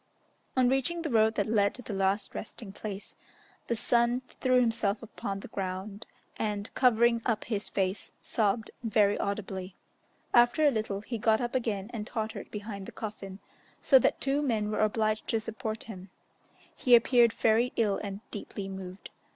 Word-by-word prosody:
On 255 -1 +5
reaching 270 +7 +1
the 315 - -2
road 220 -1 +4
that 205 - +1
led 205 -2 +2
to 250 - -9
the 220 - -5
last 195 +1 0
resting 210 -1 -7
place, 200 0 -6 0.5
the 235 - 0
son 240 +2 +2 0.2
threw 255 -1 +4
himself 225 -3 +1
upon 200 -2 -5
the - - -9
ground, 195 +2 -5 0.3
and, 210 -1 -3
covering 235 -2 +4
up 230 -3 0
his 210 -3 -3
face, 190 0 -1
sobbed 220 0 0
very 210 -3 +3
audibly. 195 -2 -3 0.6
After 240 +6 +5
a 290 - +6
little, 215 -4 -2
he 230 +1 -5
got 220 0 +3
up 240 -1 -2
again 220 -4 -2
and 215 -2 -4
tottered 220 -2 -4
behind 205 -2 -6
the - - -7
coffin, 200 -3 -7 0.4
so 265 - +6
that - - +1
two 275 +2 +1
men 220 -7 0
were - - -1
obliged 215 0 +1
to 225 - +1
support 220 0 -5
him; 190 -3 -9 0.7
he 245 -2 +6
appeared 235 0 +5
very 225 +3 +2
ill 210 -4 +1
and 200 -1 -5
deeply 200 -2 -5
moved. 190 -1 -8
220 Hz, 165 wpm, -29 LUFS, 200-235 Hz, 0.7 s, a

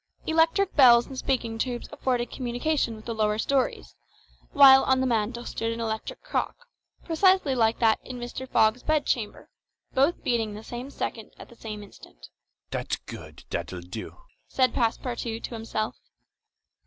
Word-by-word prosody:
Electric 325 +4 +2
bells 240 -4 +7
and 270 - -9
speaking 240 -4 -2
tubes 245 0 -2
afforded 255 -4 -1
communication 245 0 -1
with 215 - -13
the 235 - -3
lower 215 -1 +1
stories; 250 - -1 0.6
while 270 -1 +8
on 260 0 +3
the 260 - +1
mantel 235 0 -1
stood 225 0 -3
an 230 - -5
electric 220 -1 -4
clock, - - -2 0.5
precisely 355 -3 +3
like 225 -3 +2
that 225 -2 +3
in 255 - -7
Mr. 245 +2 -6
Fogg's 220 +3 +3
bedchamber, 285 -8 -1 0.5
both 280 +6 +2
beating 225 -3 0
the 215 - -9
same 240 +4 -7
second 225 -5 -5
at - - -12
the 235 - -15
same 215 -2 -7
instant. - - -15 0.4
"That's - - -2
good, - - -11
that'll 90 -1 -4
do," 90 +5 -8 0.3
said 255 -2 +2
Passepartout 230 -1 -2
to - - -5
himself. 220 -1 -3
240 Hz, 155 wpm, -26 LUFS, 220-265 Hz, 0.6 s, while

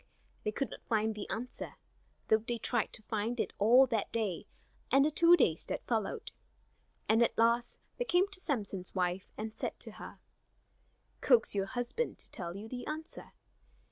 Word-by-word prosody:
They 215 - 0
could 275 +5 -2
not - - -9
find 220 -1 +2
the 210 -1 -7
answer, 245 +2 -5 0.5
though 220 - +5
they 235 +2 -3
tried - - -1
to 220 - -7
find 220 +3 -2
it - - -1
all 240 +6 +7
that 230 -5 -1
day 210 -7 -2 0.4
and 275 +1 +6
the 305 - +2
two 340 +3 +6
days 165 - +2
that - - -4
followed. 220 -4 -2 0.8
And 225 +2 +4
at 235 - +2
last 235 +1 +2 0.2
they - - -1
came 365 -2 +3
to 400 -1 -10
Samson's 205 - -3
wife 180 0 -1
and 215 +1 -5
said - - -4
to - - -2
her: - - -9 1.0
"Coax 475 - +5
your 195 -1 0
husband 245 - -2
to - - -10
tell 175 -1 -5
you 210 +2 -7
the 245 +1 -6
answer. 315 +2 -6
230 Hz, 175 wpm, -32 LUFS, 210-265 Hz, 1.0 s, all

